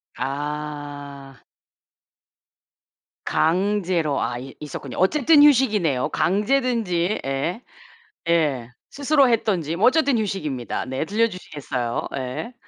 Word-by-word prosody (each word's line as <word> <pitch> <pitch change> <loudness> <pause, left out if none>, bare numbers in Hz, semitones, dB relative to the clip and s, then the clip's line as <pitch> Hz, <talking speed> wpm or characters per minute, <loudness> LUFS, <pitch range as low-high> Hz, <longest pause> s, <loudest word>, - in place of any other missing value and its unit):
아. 145 -1 -6 1.8
강제로 180 -3 +1
아 120 +1 -2
이 135 +1 -10
있었군요. 140 -4 -7
어쨌든 290 - +5
휴식이네요 210 - +3
강제든지 210 -3 +1
예. 135 - -2 0.7
예. 150 -8 +1 0.2
스스로 280 -1 +3
했든지 185 -9 0
뭐 195 +7 +4
어쨌든 280 -2 +3
휴식입니다. 155 - -3
네. 130 +4 -3
들려주시겠어요? 160 - -2
예. 130 - -5
170 Hz, 225 characters per minute, -23 LUFS, 140-225 Hz, 1.8 s, 어쨌든